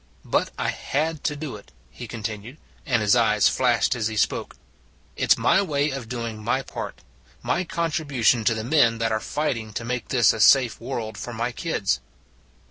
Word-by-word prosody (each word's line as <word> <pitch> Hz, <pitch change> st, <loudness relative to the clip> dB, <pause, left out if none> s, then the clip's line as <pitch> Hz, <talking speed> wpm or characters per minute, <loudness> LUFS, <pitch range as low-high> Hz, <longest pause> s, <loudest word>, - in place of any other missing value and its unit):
" -, -, -31 dB
But -, -, +2 dB
I -, -, -1 dB
had 155 Hz, +2 st, -2 dB
to 150 Hz, -, 0 dB
do 145 Hz, -5 st, -6 dB
it," 100 Hz, -, -17 dB, 0.2 s
he -, -, -9 dB
continued, 110 Hz, +4 st, -6 dB, 0.3 s
and 120 Hz, -6 st, +2 dB
his 105 Hz, +2 st, +4 dB
eyes 110 Hz, -3 st, +4 dB
flashed 125 Hz, -1 st, +2 dB
as 115 Hz, -4 st, -1 dB
he 110 Hz, -1 st, -4 dB
spoke. -, -, 0 dB, 0.3 s
" -, -, -34 dB
It -, -, +4 dB
s -, -, -5 dB
my 195 Hz, -, +3 dB
way 150 Hz, -5 st, 0 dB
of 130 Hz, -4 st, -6 dB
doing 115 Hz, -3 st, -5 dB
my 130 Hz, +4 st, 0 dB
part -, -, -7 dB, 0.4 s
my 125 Hz, +9 st, 0 dB
contribution 145 Hz, -9 st, +1 dB
to 115 Hz, -, +3 dB
the 110 Hz, -, -4 dB
men 120 Hz, -3 st, +3 dB
that 115 Hz, 0 st, 0 dB
are 110 Hz, -, +1 dB
fighting 115 Hz, -6 st, -3 dB
to 115 Hz, -, -4 dB
make 125 Hz, 0 st, -3 dB
this 120 Hz, -5 st, +4 dB
a 110 Hz, -, -6 dB
safe 120 Hz, 0 st, +5 dB
world 115 Hz, -3 st, -5 dB
for 120 Hz, -, -6 dB
my 120 Hz, +2 st, -2 dB
kids." 120 Hz, -, -1 dB
120 Hz, 200 wpm, -24 LUFS, 110-140 Hz, 0.4 s, safe